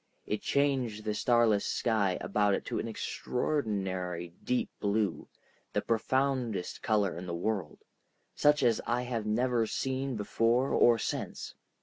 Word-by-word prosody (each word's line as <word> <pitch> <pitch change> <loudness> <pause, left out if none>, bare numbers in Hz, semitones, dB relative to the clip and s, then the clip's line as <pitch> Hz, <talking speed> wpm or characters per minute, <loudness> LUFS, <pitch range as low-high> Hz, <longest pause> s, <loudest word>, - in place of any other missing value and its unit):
It 105 - -2
changed 130 -7 0
the 105 - -1
starless 115 -2 +3
sky 105 -6 +1
about 105 0 +2
it - - -5
to - - -2
an - - -3
extraordinary 95 - -2
deep 125 0 0
blue, 100 -2 0 0.5
the - - +1
profoundest 120 -3 0
color 105 -4 +1
in 90 +2 -7
the 85 - -3
world, 90 -3 -3 0.5
such 150 -1 +3
as 115 -3 +3
I 120 +1 +1
have 115 -3 -3
never 120 +1 +1
seen 135 +1 -2
before 115 +5 +1
or 120 -1 +5
since. - - -4
110 Hz, 135 wpm, -30 LUFS, 100-125 Hz, 0.5 s, or